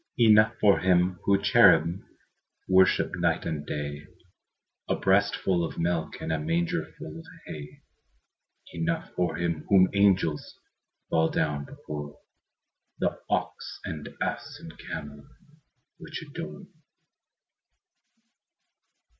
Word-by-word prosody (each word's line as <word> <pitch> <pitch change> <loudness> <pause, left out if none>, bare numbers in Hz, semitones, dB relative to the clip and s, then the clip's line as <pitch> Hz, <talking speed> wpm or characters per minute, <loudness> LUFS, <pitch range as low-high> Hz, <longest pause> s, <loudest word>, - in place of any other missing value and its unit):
Enough 110 -2 +5
for 100 -2 +5
Him 90 -1 +2
whom 100 -1 +3
cherubim 85 +4 +5 0.6
Worship 95 0 +4
night - - 0
and 75 -2 -4
day, 75 0 -5 0.8
A - - +2
breastful 90 -3 +2
of 80 - -5
milk 85 -1 -1
And - - -3
a 80 - -1
mangerful 85 +2 -3
of - - -12 0.2
hay; 75 -1 -9 0.9
Enough 165 0 -2
for 90 -1 -1
Him 85 -3 -2
whom 95 -2 +5
angels 95 -6 +2 0.5
Fall 80 0 +3
down 75 -2 -1
before, 75 0 -8 0.8
The - - -1
ox - - -3
and 75 -2 -6
ass - - -3
and - - -10
camel 70 -1 -8 0.7
Which 165 -2 -7
adore. 165 +5 -8
85 Hz, 105 wpm, -27 LUFS, 75-100 Hz, 0.9 s, Enough